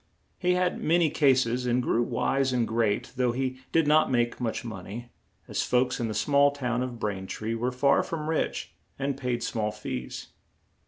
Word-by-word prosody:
He 180 Hz, 0 st, +2 dB
had 180 Hz, 0 st, 0 dB
ma 165 Hz, +3 st, +4 dB
ny 170 Hz, -3 st, +3 dB
cas 135 Hz, -5 st, +4 dB
es, 125 Hz, +2 st, -2 dB
and 120 Hz, +1 st, +2 dB
grew 120 Hz, -1 st, +1 dB
wise 135 Hz, +2 st, +1 dB
and 120 Hz, -2 st, +1 dB
great, 110 Hz, -2 st, 0 dB
though 125 Hz, -2 st, +2 dB
he 130 Hz, 0 st, -2 dB
did 165 Hz, -1 st, +3 dB
not 155 Hz, +1 st, +4 dB
make 120 Hz, -1 st, 0 dB
much 120 Hz, 0 st, -2 dB
mon 110 Hz, -6 st, -7 dB
ey, 120 Hz, +5 st, -7 dB, 0.4 s
as -, -, -1 dB
folks 125 Hz, 0 st, +1 dB
in 120 Hz, -, -1 dB
the 110 Hz, -, -4 dB
small 140 Hz, +7 st, +4 dB
town 125 Hz, -4 st, -2 dB
of 125 Hz, -2 st, -4 dB
Brain 95 Hz, -3 st, -3 dB
tree 110 Hz, +3 st, -3 dB
were 120 Hz, +2 st, -1 dB
far 140 Hz, +2 st, +3 dB
from 155 Hz, -2 st, -4 dB
rich 160 Hz, 0 st, -1 dB, 0.2 s
and 140 Hz, 0 st, -1 dB
paid 125 Hz, -2 st, -2 dB
small 105 Hz, -2 st, -1 dB
fees. 65 Hz, -11 st, -6 dB
125 Hz, 200 wpm, -27 LUFS, 115-140 Hz, 0.4 s, ma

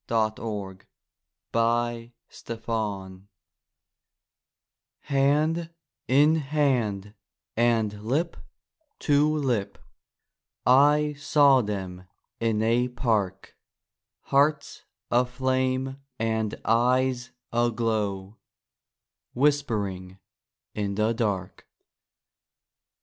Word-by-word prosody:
SONGS 110 Hz, -4 st, -2 dB, 0.7 s
AND 115 Hz, +1 st, 0 dB, 0.2 s
DREAMS 115 Hz, -1 st, -9 dB
Love 100 Hz, -5 st, -3 dB, 1.8 s
Hand 150 Hz, +4 st, +1 dB, 0.4 s
in 145 Hz, +4 st, +5 dB
hand 130 Hz, -9 st, 0 dB, 0.4 s
and 110 Hz, -3 st, +1 dB
lip 150 Hz, +9 st, -1 dB, 0.6 s
to 145 Hz, +1 st, +2 dB
lip 120 Hz, -9 st, -1 dB, 0.9 s
I 145 Hz, +3 st, +5 dB
saw 145 Hz, -2 st, +5 dB
them 95 Hz, -4 st, -5 dB, 0.3 s
in 110 Hz, -2 st, 0 dB
a 120 Hz, +2 st, +2 dB
park; 110 Hz, -7 st, -2 dB, 0.7 s
Hearts 145 Hz, +2 st, +1 dB, 0.3 s
aflame 130 Hz, +1 st, 0 dB, 0.2 s
and 110 Hz, -2 st, -1 dB
eyes 125 Hz, +2 st, +2 dB, 0.2 s
aglow, 110 Hz, -4 st, -1 dB, 1.0 s
Whisp'ring 105 Hz, -10 st, 0 dB, 0.6 s
in 100 Hz, -1 st, -2 dB
the 110 Hz, +2 st, +1 dB
dark. 100 Hz, -6 st, -3 dB
115 Hz, 70 wpm, -26 LUFS, 105-135 Hz, 1.8 s, in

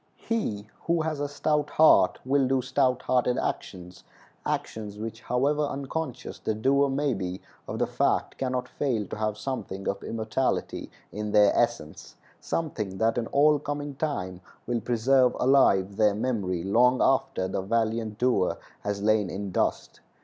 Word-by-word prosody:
He 110 Hz, -, -2 dB, 0.2 s
who 170 Hz, -1 st, +2 dB
has 155 Hz, -2 st, -2 dB
a 145 Hz, -, -1 dB
stout 150 Hz, 0 st, 0 dB
heart 155 Hz, +1 st, +5 dB
will 135 Hz, 0 st, +2 dB
do 130 Hz, -1 st, +1 dB
stout 130 Hz, -1 st, +1 dB
hearted 125 Hz, -1 st, +1 dB
actions—actions 100 Hz, +3 st, -5 dB
which, 110 Hz, +1 st, -6 dB
however 140 Hz, +5 st, +1 dB
unconscious 140 Hz, -2 st, -4 dB
the 110 Hz, -, -2 dB
doer 140 Hz, +5 st, +2 dB
may 140 Hz, 0 st, 0 dB
be 95 Hz, -2 st, -4 dB, 0.3 s
of -, -, -4 dB
the -, -, +1 dB
fact, -, -, 0 dB
can 130 Hz, -1 st, -1 dB
not 125 Hz, 0 st, -2 dB
fail 125 Hz, -6 st, -1 dB
to -, -, -7 dB
have 110 Hz, -1 st, -1 dB
something 110 Hz, -5 st, -5 dB
of 100 Hz, -, -2 dB
immortality 115 Hz, +3 st, -2 dB, 0.2 s
in 105 Hz, 0 st, -4 dB
their 105 Hz, -1 st, +5 dB
essence—something 110 Hz, -, -3 dB
that 115 Hz, +3 st, +1 dB
in 115 Hz, -, -3 dB
all 150 Hz, +1 st, +4 dB
coming 145 Hz, 0 st, -4 dB
time 95 Hz, -, -3 dB, 0.2 s
will 120 Hz, -1 st, -1 dB
preserve 125 Hz, +2 st, +3 dB
alive 100 Hz, -8 st, +3 dB
their 105 Hz, -2 st, +3 dB
memory 100 Hz, -7 st, -1 dB
long 125 Hz, +6 st, +3 dB
after 95 Hz, -8 st, +1 dB
the 95 Hz, -, -2 dB
valiant 110 Hz, +1 st, -1 dB
doer 120 Hz, -6 st, +1 dB, 0.2 s
has 100 Hz, 0 st, -3 dB
lain 105 Hz, -2 st, +2 dB
in 100 Hz, +1 st, -5 dB
dust. -, -, -1 dB
120 Hz, 150 wpm, -27 LUFS, 105-135 Hz, 0.3 s, heart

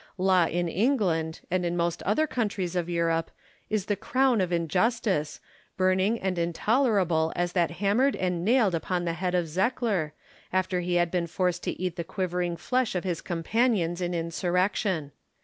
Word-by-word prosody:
Law 185 Hz, -2 st, +3 dB
in 175 Hz, +1 st, -1 dB
England, 175 Hz, -, 0 dB
and 185 Hz, 0 st, +1 dB
in 175 Hz, 0 st, -1 dB
most 170 Hz, 0 st, -1 dB
other 215 Hz, +11 st, +2 dB
countries 205 Hz, -, -2 dB
of 175 Hz, -1 st, -1 dB
Europe, 165 Hz, -1 st, 0 dB, 0.4 s
is 215 Hz, -3 st, 0 dB
the 205 Hz, -, 0 dB
crown 250 Hz, +2 st, +2 dB
of 180 Hz, -1 st, -1 dB
injustice, 180 Hz, -1 st, 0 dB, 0.4 s
burning 185 Hz, +4 st, +2 dB
and 185 Hz, -2 st, -1 dB
intolerable 175 Hz, -2 st, +2 dB
as 175 Hz, 0 st, 0 dB
that 175 Hz, -2 st, +2 dB
hammered 205 Hz, +10 st, +1 dB
and 180 Hz, -2 st, -1 dB
nailed 220 Hz, -2 st, +3 dB
upon 175 Hz, +1 st, -1 dB
the 170 Hz, -, 0 dB
head 180 Hz, +1 st, -2 dB
of 175 Hz, -1 st, +1 dB
Zekkler, 190 Hz, -2 st, 0 dB, 0.4 s
after 185 Hz, -1 st, 0 dB
he 175 Hz, 0 st, -1 dB
had 175 Hz, -1 st, +2 dB
been 175 Hz, -2 st, 0 dB
forced 180 Hz, +1 st, -1 dB
to -, -, -3 dB
eat 180 Hz, -1 st, -3 dB
the 170 Hz, -, -2 dB
quivering 175 Hz, -1 st, -2 dB
flesh 250 Hz, +5 st, 0 dB
of 180 Hz, -, -1 dB
his 175 Hz, -4 st, -2 dB
companions 180 Hz, 0 st, 0 dB
in 175 Hz, 0 st, -1 dB
insurrection. 175 Hz, -1 st, 0 dB
180 Hz, 165 wpm, -27 LUFS, 170-205 Hz, 0.4 s, Law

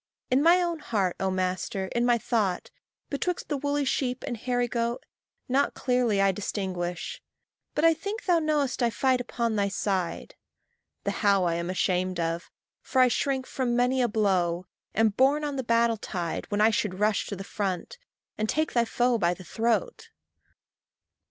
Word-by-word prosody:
In 260 Hz, +2 st, +4 dB
my 340 Hz, +4 st, +6 dB
own 340 Hz, -2 st, -2 dB
heart, 200 Hz, -9 st, -1 dB
O 190 Hz, -, 0 dB
master, 185 Hz, +1 st, -1 dB
in 240 Hz, 0 st, +1 dB
my 240 Hz, -1 st, +4 dB
thought, 215 Hz, -6 st, -1 dB, 0.4 s
Betwixt 345 Hz, +5 st, -2 dB
the 295 Hz, -, 0 dB
woolly 285 Hz, +1 st, 0 dB
sheep 255 Hz, -1 st, -1 dB
and 240 Hz, -, -3 dB
hairy 245 Hz, +1 st, -1 dB
goat 235 Hz, 0 st, -2 dB, 0.4 s
Not 275 Hz, +2 st, +1 dB
clearly 245 Hz, -5 st, +1 dB
I 195 Hz, 0 st, +4 dB
distinguish; 185 Hz, -3 st, -4 dB, 0.5 s
but 305 Hz, -, +2 dB
I 330 Hz, -, +7 dB
think 405 Hz, +8 st, -5 dB
Thou 350 Hz, -3 st, +4 dB
knowest 300 Hz, -4 st, 0 dB
that 240 Hz, -, +3 dB
I -, -, +1 dB
fight 255 Hz, +2 st, +1 dB
upon 235 Hz, -2 st, -2 dB
thy 200 Hz, -1 st, +2 dB
side. 195 Hz, -3 st, -2 dB, 0.7 s
The -, -, 0 dB
how 200 Hz, -3 st, +2 dB
I 170 Hz, -1 st, +1 dB
am 170 Hz, +1 st, -2 dB
ashamed 185 Hz, -1 st, 0 dB
of; 165 Hz, +1 st, -2 dB, 0.3 s
for 260 Hz, -, -1 dB
I 255 Hz, -1 st, +6 dB
shrink 265 Hz, +1 st, 0 dB
From 250 Hz, -3 st, -1 dB
many 250 Hz, +2 st, +2 dB
a 245 Hz, -, +3 dB
blow 185 Hz, -5 st, +1 dB, 0.3 s
am 225 Hz, +1 st, +4 dB
borne 270 Hz, +8 st, +3 dB
on 290 Hz, -1 st, -2 dB
the 260 Hz, -, -2 dB
battle 230 Hz, -1 st, +2 dB
tide, 175 Hz, -5 st, -4 dB
When 205 Hz, 0 st, 0 dB
I 220 Hz, +1 st, +6 dB
should 210 Hz, -4 st, -1 dB
rush 210 Hz, 0 st, +1 dB
to 200 Hz, -, -4 dB
the 195 Hz, -, -7 dB
front, 195 Hz, -, -3 dB, 0.4 s
and 215 Hz, 0 st, 0 dB
take 310 Hz, 0 st, 0 dB
thy 235 Hz, -1 st, +3 dB
foe 240 Hz, +1 st, +1 dB
by 175 Hz, -1 st, +2 dB
the 185 Hz, -, -11 dB
throat. 235 Hz, -, -1 dB
230 Hz, 180 wpm, -27 LUFS, 190-260 Hz, 0.7 s, I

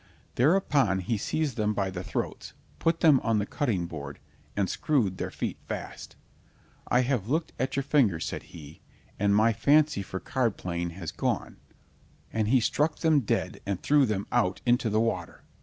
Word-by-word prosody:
Thereupon 140 Hz, -, +3 dB
he 110 Hz, +6 st, -1 dB
seized 145 Hz, +5 st, -2 dB
them 105 Hz, -1 st, 0 dB
by 95 Hz, -2 st, -1 dB
the 90 Hz, -1 st, -5 dB
throats, -, -, -4 dB, 0.3 s
put 165 Hz, 0 st, +1 dB
them 150 Hz, -6 st, +6 dB
on 115 Hz, -2 st, +1 dB
the 100 Hz, -, 0 dB
cutting 105 Hz, -9 st, -1 dB
board 75 Hz, -4 st, -7 dB, 0.4 s
and 100 Hz, -2 st, +2 dB
screwed 110 Hz, -11 st, 0 dB
their -, -, -2 dB
feet -, -, -4 dB
fast. -, -, -7 dB, 0.7 s
"I 125 Hz, -, +3 dB
have 120 Hz, -5 st, -1 dB
looked 160 Hz, +4 st, -1 dB
at 130 Hz, +1 st, -1 dB
your 140 Hz, -, 0 dB
fingers," 115 Hz, -, +2 dB
said -, -, -4 dB
he, 75 Hz, -2 st, -12 dB, 0.4 s
"and 100 Hz, 0 st, +3 dB
my 110 Hz, +2 st, +4 dB
fancy 145 Hz, +4 st, +3 dB
for 95 Hz, 0 st, -5 dB
card 120 Hz, -3 st, -1 dB
playing 85 Hz, -1 st, -3 dB
has 85 Hz, -5 st, -5 dB
gone, -, -, -2 dB, 0.8 s
and 110 Hz, -2 st, 0 dB
he 130 Hz, +3 st, +4 dB
struck 150 Hz, +6 st, +1 dB
them 160 Hz, -3 st, +3 dB
dead 120 Hz, -, -2 dB
and 100 Hz, -2 st, -1 dB
threw 145 Hz, -2 st, +3 dB
them 100 Hz, -2 st, -1 dB
out 105 Hz, -6 st, +1 dB
into 120 Hz, -1 st, +2 dB
the 110 Hz, +1 st, +2 dB
water. 95 Hz, -7 st, -2 dB
115 Hz, 175 wpm, -28 LUFS, 95-140 Hz, 0.8 s, them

